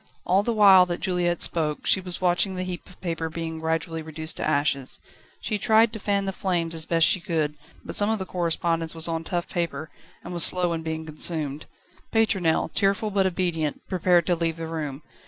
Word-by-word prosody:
All 185 +2 +3
the 235 - -1
while 195 -4 +7
that 175 -1 -3
Juliette 175 -2 0
spoke, 155 -3 -1
she 190 - +3
was 180 -1 -1
watching 185 +1 +1
the 185 - -3
heap 180 -1 -6
of 180 - -17
paper 165 -2 -3
being 160 0 -5
gradually 160 0 -2
reduced 160 0 -6
to - - -2
ashes. 140 -3 0 0.4
She 210 -2 -2
tried 220 +2 +4
to 220 - -6
fan 200 -1 0
the 195 - -3
flames 175 -3 -2
as 160 -1 +1
best 165 -1 +3
she 185 - +3
could, 160 -5 -2 0.3
but - - -5
some 205 +1 +4
of 220 - +1
the 190 - -5
correspondence 165 -2 -1
was 160 0 +2
on 165 -1 -2
tough 175 0 -3
paper, 160 -3 -4 0.3
and 180 - -7
was 170 - +6
slow 180 -2 +4
in 165 - -3
being 160 0 -4
consumed. 155 -2 -2 0.4
Pétronelle, 190 -8 +1
tearful 200 +2 +1
but 195 -1 +2
obedient, 170 -5 -2
prepared 180 -2 +2
to 180 - +1
leave 165 -1 -2
the 165 - -5
room. 155 -3 -5
170 Hz, 205 wpm, -25 LUFS, 160-185 Hz, 0.4 s, while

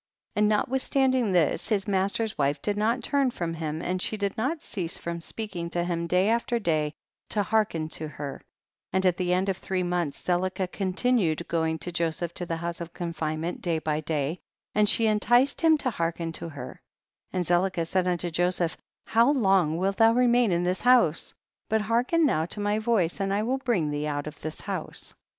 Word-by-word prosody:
77. - - -12
And 210 - +4
notwithstanding 260 +1 +1
this, 170 -5 +2
his 210 -2 0
master's 200 +3 0
wife 140 0 +1
did 205 - -1
not 220 +4 +1
turn 280 -2 +2
from 170 -8 -3
him, 160 -1 -4
and 180 +1 -1
she 215 - -2
did 200 -1 -2
not 275 +9 -1
cease 180 - -4
from 170 0 -5
speaking 180 -3 -5
to 175 0 -1
him 170 -1 -2
day 180 +3 +3
after 235 +1 +1
day 155 -7 0 0.3
to 210 - +1
hearken 195 -6 +1
to 155 0 -4
her, 145 -2 -7 0.5
and 190 0 +1
at 180 -1 +3
the 180 -1 0
end 185 +2 +2
of 190 -2 0
three 185 0 -2
months 175 -4 -1
Zelicah 185 +1 -1
continued 190 -4 0
going 160 -1 0
to 170 +4 -4
Joseph 170 0 -2
to 175 - -4
the 165 - -1
house 170 +1 -4
of 170 0 -7
confinement 165 -1 -3
day 170 -2 0
by 155 -1 -1
day, 155 +1 -2 0.3
and 210 0 +3
she 230 0 +3
enticed 240 +5 +3
him 320 -1 +5
to 265 -4 -1
hearken 165 -3 -2
to 165 - -5
her, 145 -3 -9 0.5
and 180 -1 -1
Zelicah 175 0 +1
said 185 +2 0
unto 175 -1 -1
Joseph, 175 0 +1 0.3
how 230 +3 +4
long 190 - +3
wilt 195 +2 0
thou 225 0 +6
remain 245 -2 +4
in 175 0 +1
this 180 +1 0
house? 245 -10 +3 0.3
but 220 0 +2
hearken 240 +10 +2
now 160 - +1
to 210 - -5
my 205 +1 +1
voice 215 -6 +1
and 195 0 0
I 205 +2 +1
will 260 +4 0
bring 215 - 0
thee 145 +1 -2
out 145 -1 -2
of 150 -1 -9
this 155 0 -6
house. - - -4
180 Hz, 200 wpm, -27 LUFS, 165-220 Hz, 0.5 s, thou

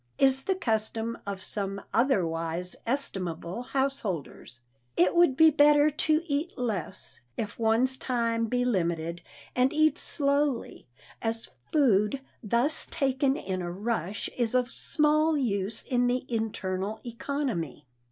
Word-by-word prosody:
is 270 0 +3
the 385 - +1
custom 225 - -1
of 195 -2 -4
some 195 -1 -3
otherwise 180 -7 0
estimable 185 - -2
householders. 235 - -3 0.4
It 180 +2 +4
would 345 -6 +5
be 320 -1 +8
better 295 +1 +5
to 310 +2 +1
eat 300 +2 -2
less, 195 - -4 0.2
if 210 0 -4
one's 230 +4 +3
time 230 -3 0
be 245 +2 0
limited, 170 -6 -1 0.3
and 255 +2 +3
eat 310 0 +3
slowly, 280 -3 0 0.3
as 225 0 -2 0.2
food 240 -4 +3 0.2
thus 235 +6 +1
taken 270 0 +1
in 185 -1 -3
a 175 -1 -3
rush 205 0 -2
is 240 -1 0
of 250 0 +2
small 305 +2 +2
use 210 -5 -1
in 245 -1 +1
the 250 +1 0
internal 210 -3 -2
economy. 235 - -3
235 Hz, 125 wpm, -28 LUFS, 195-275 Hz, 0.4 s, be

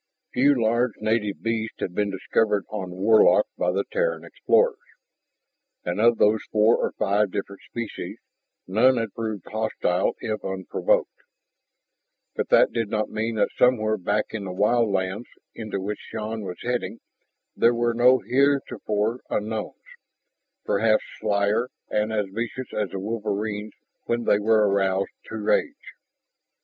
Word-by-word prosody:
Few 140 +1 +4
large 120 +1 +2
native 110 -2 -1
beasts 115 -1 -2
had 90 - -3
been 105 +2 0
discovered 105 +1 0
on 100 -4 -4
Warlock 105 - +4
by - - 0
the - - 0
Terran - - 0
explorers. 475 -3 +2 1.1
And 90 +4 -1
of 115 0 +5
those 105 +1 +3
four 110 +2 +4
or - - -1
five 100 +1 +1
different 100 +1 -5
species, 115 -2 -6 0.5
none 120 +7 +4
had 115 -3 -2
proved 110 -5 -4
hostile 110 -4 0
if 110 -1 -4
unprovoked. 445 - -1 1.2
But - - -2
that - - +5
did 115 -3 -2
not 105 0 -1
mean 110 +1 -2
that 105 - +1
somewhere 110 -4 +3
back 100 +2 0
in 110 -2 -4
the 95 - -4
wild 105 +4 +2
lands 95 +3 -2 0.3
into 110 -3 -5
which 100 +2 -4
Shann 110 0 -5
was 90 -3 -6
heading 120 -2 -2 0.6
there 120 +1 +4
were 120 0 +1
no 125 +2 +4
heretofore 120 -5 +1
unknowns, 110 0 -3 0.9
perhaps 110 +2 +2 0.2
slyer 105 +3 +1 0.2
and 105 +1 0
as 105 -2 0
vicious 120 +4 -5
as 105 -3 -1
the - - -6
wolverines 105 0 -3 0.3
when 120 0 -1
they 105 - +3
were 110 0 +3
aroused 95 -1 +1
to - - -8
rage. 275 - -1
110 Hz, 140 wpm, -24 LUFS, 100-115 Hz, 1.2 s, of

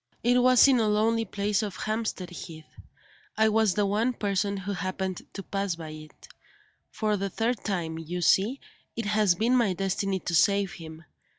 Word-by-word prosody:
It 245 +1 +4
was 255 +1 +6
in 260 -3 +4
a 220 - +2
lonely 225 +2 +2
place 205 +1 -1
on 210 - -2
Hampstead 215 -2 -4
Heath; 160 -2 -9 0.7
I 220 0 +4
was 220 -3 +2
the 205 - +2
one 215 +5 +1
person 200 -2 -1
who 195 +1 -5
happened 185 -1 -4
to 195 - -6
pass 195 -3 -2
by 165 -2 -8
it. 155 0 -12 0.6
For 215 -1 -1
the 195 0 -2
third 230 +4 -2
time, 165 -5 -3
you 175 +2 -5
see, 210 +10 +3 0.4
it 230 - -3
has 210 -3 +3
been 230 +7 +2
my 230 -6 +2
destiny 195 +1 -1
to 175 - -4
save 200 +3 +3
him. 165 -5 -10
200 Hz, 180 wpm, -27 LUFS, 185-220 Hz, 0.7 s, was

